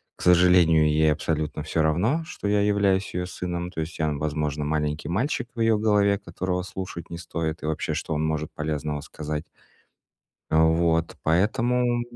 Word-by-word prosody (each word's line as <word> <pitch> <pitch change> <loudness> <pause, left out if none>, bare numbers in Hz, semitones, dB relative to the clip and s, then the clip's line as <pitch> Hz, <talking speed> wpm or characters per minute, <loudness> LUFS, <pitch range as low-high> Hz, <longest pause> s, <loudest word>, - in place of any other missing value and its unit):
к - - -15
сожалению, 90 -3 +5
ей 75 0 +3
абсолютно 75 0 -2
всё 80 +1 0
равно, 105 - +1
что 160 - -9
я 105 0 +3
являюсь 100 -1 +1
её 90 0 -2
сыном, 90 -1 -4
то 80 - -6
есть 80 +1 -4
я, 80 -1 +1
возможно, 75 0 -2
маленький 75 0 -1
мальчик 120 - -1
в 115 - -3
её 115 -1 +4
голове, 105 -2 +3
которого 90 0 -3
слушать 95 -2 -7
не 85 - -6
стоит, 80 -1 -4
и - - -3
вообще, 80 0 -2
что 80 0 -3
он 75 0 0
может 80 -1 -2
полезного 75 -1 -3
сказать. 75 +1 -5 1.0
Вот, 80 +1 +2
поэтому 120 +8 +2
85 Hz, 165 wpm, -25 LUFS, 75-95 Hz, 1.0 s, сожалению